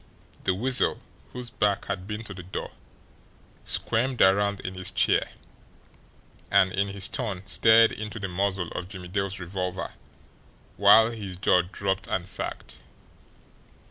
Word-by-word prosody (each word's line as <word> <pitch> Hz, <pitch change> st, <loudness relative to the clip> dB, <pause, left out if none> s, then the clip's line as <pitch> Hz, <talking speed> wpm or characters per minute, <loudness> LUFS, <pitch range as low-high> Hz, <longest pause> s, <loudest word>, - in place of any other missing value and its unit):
The 95 Hz, -, +2 dB
Weasel, 125 Hz, +5 st, +2 dB, 0.3 s
whose 125 Hz, -1 st, -6 dB
back 100 Hz, -3 st, 0 dB
had 95 Hz, -2 st, -4 dB
been 105 Hz, +1 st, -5 dB
to 105 Hz, -, -8 dB
the 90 Hz, -, -8 dB
door, 90 Hz, +2 st, -6 dB, 0.9 s
squirmed 125 Hz, +3 st, 0 dB
around 100 Hz, +1 st, +4 dB
in 95 Hz, -, -5 dB
his 95 Hz, -1 st, -3 dB
chair -, -, +2 dB, 1.2 s
and 95 Hz, -1 st, +4 dB
in 100 Hz, +1 st, +1 dB
his 100 Hz, -1 st, -2 dB
turn 100 Hz, -4 st, -4 dB
stared 115 Hz, +3 st, +5 dB
into 110 Hz, +1 st, -6 dB
the 100 Hz, -3 st, -3 dB
muzzle 95 Hz, -1 st, -1 dB
of 90 Hz, -, -6 dB
Jimmie 90 Hz, -2 st, -9 dB
Dale's 100 Hz, 0 st, -2 dB
revolver, 90 Hz, 0 st, -4 dB, 0.8 s
while 110 Hz, +3 st, +6 dB
his 100 Hz, -6 st, -7 dB
jaw 90 Hz, -1 st, +4 dB
dropped 95 Hz, +2 st, -3 dB
and 90 Hz, -1 st, -2 dB
sagged. -, -, -5 dB
100 Hz, 140 wpm, -26 LUFS, 95-105 Hz, 1.2 s, while